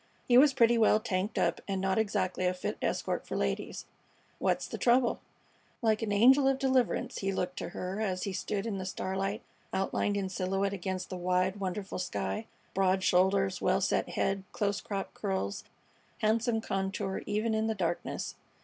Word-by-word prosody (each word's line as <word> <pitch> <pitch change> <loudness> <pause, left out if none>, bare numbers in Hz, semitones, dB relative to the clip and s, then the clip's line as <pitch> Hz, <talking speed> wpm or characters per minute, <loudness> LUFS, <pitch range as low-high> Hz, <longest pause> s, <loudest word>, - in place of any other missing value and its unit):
He 245 - +4
was 275 +3 +8
pretty 235 -2 +5
well 215 -1 +5
tanked 200 -2 -2
up - - +1
and 195 -1 -1
not 190 +2 +1
exactly 190 -4 0
a 180 - 0
fit 180 - -3
escort - - -1
for - - -3
ladies. 65 -1 -2 0.5
What's - - +1
the - - -6
trouble?" 240 0 +3 0.6
Like 220 -1 +3
an 220 -2 -1
angel 260 +7 +6
of 270 -1 +3
deliverance 260 -2 +1
he 195 0 -1
looked 180 -1 -2
to - - -4
her 185 +3 -4
as 185 -4 -1
he 195 - -2
stood 200 +2 -2
in 205 -4 -2
the 185 - -4
starlight, 195 +2 -2 0.3
outlined 195 +1 0
in 195 -1 -1
silhouette 195 +1 -1
against 190 0 -4
the 185 - -3
wide, 185 +2 +1
wonderful 195 +1 -3
sky: 215 +4 -3 0.3
broad 190 0 +2
shoulders, 190 +1 +3
well - - +3
set 195 - +1
head, 195 0 0
close 200 -1 0
cropped 195 -2 -4
curls, 190 - -3 0.5
handsome 225 +1 +1
contour 195 -1 -2
even 215 +2 0
in 220 0 +1
the 220 - 0
darkness. 175 -3 -2
195 Hz, 175 wpm, -30 LUFS, 185-220 Hz, 0.6 s, was